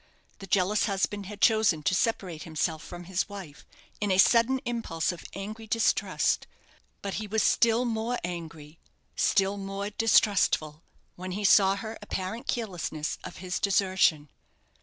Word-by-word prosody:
The 195 Hz, -, -9 dB
jealous 195 Hz, +2 st, +2 dB
husband 200 Hz, 0 st, -1 dB
had 210 Hz, 0 st, -9 dB
chosen 215 Hz, -9 st, +3 dB
to 185 Hz, -, +1 dB
separate 185 Hz, -5 st, -1 dB
himself 160 Hz, -1 st, -2 dB
from 175 Hz, 0 st, -9 dB
his 185 Hz, +3 st, -2 dB
wife 180 Hz, -9 st, -10 dB, 0.3 s
in 210 Hz, -, -1 dB
a 185 Hz, -, +2 dB
sudden 235 Hz, +6 st, +5 dB
impulse 225 Hz, -10 st, -2 dB
of 175 Hz, -, -10 dB
angry 215 Hz, +3 st, -7 dB
distrust; 230 Hz, +1 st, +1 dB, 0.6 s
but 200 Hz, -1 st, -3 dB
he 215 Hz, -, -5 dB
was 220 Hz, +2 st, +1 dB
still 235 Hz, +1 st, +3 dB
more 230 Hz, +1 st, -1 dB
angry, 165 Hz, -3 st, -7 dB, 0.4 s
still 195 Hz, +1 st, +2 dB
more 195 Hz, +1 st, -4 dB
distrustful, 200 Hz, -8 st, +2 dB, 0.4 s
when 185 Hz, +1 st, -5 dB
he 205 Hz, +2 st, -3 dB
saw 195 Hz, 0 st, +6 dB
her 220 Hz, +2 st, -7 dB
apparent 190 Hz, +5 st, -5 dB
carelessness 175 Hz, -9 st, -3 dB
of -, -, -8 dB
his 180 Hz, +1 st, -4 dB
desertion. 185 Hz, -7 st, +2 dB
195 Hz, 145 wpm, -28 LUFS, 175-220 Hz, 0.6 s, saw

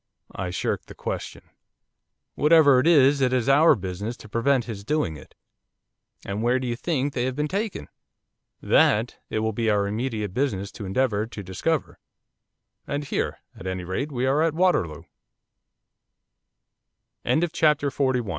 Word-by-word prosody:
I 95 Hz, -1 st, -4 dB
shirked 90 Hz, -, -3 dB
the -, -, -11 dB
question. -, -, -5 dB, 0.9 s
'Whatever 150 Hz, -4 st, +5 dB
it 135 Hz, -, +1 dB
is, 140 Hz, -4 st, +5 dB
it 130 Hz, -1 st, +3 dB
is 130 Hz, -2 st, 0 dB
our 145 Hz, +3 st, +6 dB
business 100 Hz, +3 st, -5 dB
to -, -, -13 dB
prevent 120 Hz, +3 st, +1 dB
his 105 Hz, -3 st, -7 dB
doing 150 Hz, -, -1 dB
it.' 75 Hz, -, -14 dB, 0.9 s
'And 100 Hz, +2 st, -3 dB
where 120 Hz, +2 st, +2 dB
do 130 Hz, -, -3 dB
you 120 Hz, -1 st, -2 dB
think 140 Hz, +1 st, -1 dB
they 125 Hz, -1 st, -1 dB
have 130 Hz, -1 st, -2 dB
been 150 Hz, +1 st, -1 dB
taken?' 205 Hz, +5 st, -3 dB, 0.8 s
'That 110 Hz, +3 st, +3 dB
it -, -, -2 dB
will 110 Hz, 0 st, -1 dB
be 115 Hz, +1 st, 0 dB
our 100 Hz, -1 st, +2 dB
immediate 105 Hz, -2 st, -3 dB
business 100 Hz, -7 st, -1 dB
to 105 Hz, -, -8 dB
endeavour 105 Hz, +1 st, 0 dB
to 105 Hz, -3 st, -8 dB
discover, 135 Hz, -, -2 dB, 0.9 s
and 145 Hz, +1 st, -2 dB
here, 140 Hz, -, -3 dB
at 95 Hz, -, -9 dB
any 95 Hz, -1 st, -3 dB
rate, 95 Hz, +12 st, -3 dB
we 130 Hz, -1 st, -1 dB
are 135 Hz, +3 st, +2 dB
at 165 Hz, -1 st, +2 dB
125 Hz, 145 wpm, -24 LUFS, 105-140 Hz, 0.9 s, our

